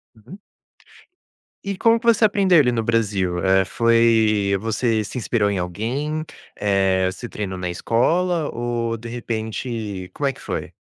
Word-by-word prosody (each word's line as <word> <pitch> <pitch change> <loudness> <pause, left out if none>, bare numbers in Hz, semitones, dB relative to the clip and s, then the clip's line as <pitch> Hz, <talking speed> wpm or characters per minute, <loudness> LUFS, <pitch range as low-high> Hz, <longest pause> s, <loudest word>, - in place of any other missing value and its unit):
Uhum. 170 - -14 1.2
E 195 -1 -4
como 230 +3 +4
que 235 - -6
você 230 -1 +5
aprendeu 195 -4 +3
ele 135 -5 +4
no 115 -1 0
Brasil? 105 -6 0
Eh, 95 0 +4
foi 110 -3 +3
você 110 +1 0
se - - -9
inspirou 110 -3 0
em 100 -2 -1
alguém? 130 - -3 0.3
Eh, 95 -2 +1
você 120 +5 -8
treinou 100 -3 -5
na 90 -1 -4
escola 160 - +1
ou, 120 -1 -2
de 115 +1 -9
repente 110 -4 -4
como 145 - -2
é 135 - 0
que - - -16
foi? - - -5
115 Hz, 155 wpm, -21 LUFS, 100-135 Hz, 1.2 s, você